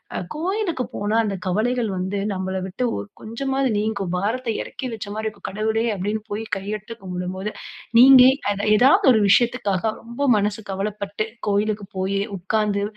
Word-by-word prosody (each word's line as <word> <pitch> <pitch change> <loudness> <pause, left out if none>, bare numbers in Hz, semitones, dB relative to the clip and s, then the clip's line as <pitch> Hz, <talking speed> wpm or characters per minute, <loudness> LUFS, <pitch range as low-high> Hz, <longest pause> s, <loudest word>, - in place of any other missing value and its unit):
அ - - -1 0.2
கோயிலுக்கு 355 -3 -1
போனா 205 +2 -1
அந்த 200 -2 -2
கவலைகள் 225 +5 0
வந்து 190 +2 -2
நம்பள 190 0 -3
விட்டு 195 +7 -4
ஒ - - -3 0.2
கொஞ்சமாவது 270 +4 -1
நீங்கும். 200 -4 -2
பாரத்த 230 +5 -1
இறக்கி 260 - -6
வச்சமாரி 215 0 -5
இருக்கும். 210 -2 -7
கடவுளே! 220 +3 0
அப்பிடீன்னு 205 +3 -2
போய் 215 +2 -2
கையெடுத்து 210 +3 -6
கும்பிடும்போது, 185 +2 -4 0.5
நீங்க 260 0 +9 0.3
அத 200 - -3 0.2
ஏதாவது 265 +4 +5
ஒரு 220 - +3
விஷயத்துக்காக 210 -3 +2 0.2
ரொம்ப 235 +5 -3
மனசு 210 +1 -1
கவலப்பட்டு, 200 +2 -3 0.2
கோயிலுக்குப் 205 -1 -1
போயி 195 +1 0 0.2
உக்காந்து, 200 +2 0
210 Hz, 145 wpm, -22 LUFS, 195-230 Hz, 0.5 s, நீங்க